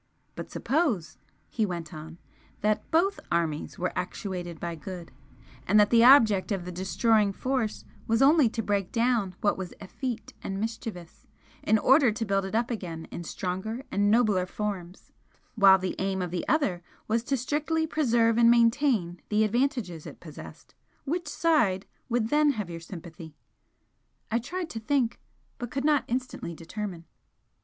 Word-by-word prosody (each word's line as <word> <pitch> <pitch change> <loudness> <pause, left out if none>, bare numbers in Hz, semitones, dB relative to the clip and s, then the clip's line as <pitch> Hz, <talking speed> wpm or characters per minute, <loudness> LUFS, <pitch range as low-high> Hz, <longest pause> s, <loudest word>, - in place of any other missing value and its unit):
"But - - -7
suppose" 270 - -1 0.3
he 225 - -1
went 170 -6 -4
on 160 +1 -9 0.4
"that 210 0 0
BOTH 375 +5 +2
armies 165 -3 -1
were 180 - -2
actuated 180 -3 -4
by 170 -1 -4
good, 175 +1 -8 0.6
and 210 +3 +5
that 205 - +4
the 230 -1 +6
object 225 -7 +6
of 190 -3 -2
the 180 - -5
destroying 200 +3 +2
force 250 0 -2 0.2
was 225 0 +2
only 280 -2 +5
to 225 0 -3
break 200 -3 -1
down 230 -6 +1
what 205 -2 +1
was 185 -2 -6
effete 240 +4 -5
and 195 0 -4
mischievous, 215 -6 -6 0.3
in 220 - +3
order 265 +2 +5
to 225 +2 -3
build 195 -1 0
it 195 - -4
up 235 +2 +1
again 170 -7 -5
in 170 - -6
stronger 190 +8 -4
and 205 +1 +2
nobler 210 -5 +3
forms, 190 -3 -5 0.4
while 195 -4 +7
the 185 -1 -3
aim 190 0 -1
of 175 - -4
the 175 -1 -3
other 220 - +1 0.3
was 225 +1 +1
to 275 -1 0
strictly 305 +5 0
preserve 235 -7 +2
and 235 0 +7
maintain 230 - +3
the 215 0 +3
advantages 230 - -1
it - - -11
possessed, - - -12 0.3
which 340 +4 -2
side 225 - +2 0.2
would 230 -2 0
then 295 +1 +4
have 210 -7 -5
your 165 - -6
sympathy?" 165 -2 -10 1.0
I 230 - +2
tried 345 +7 -5
to 225 - -5
think, 240 0 0 0.4
but 245 -2 -4
could 270 +3 -3
not 300 -2 +3
instantly 250 -8 -4
determine. 175 +1 -6
215 Hz, 160 wpm, -27 LUFS, 185-245 Hz, 1.0 s, while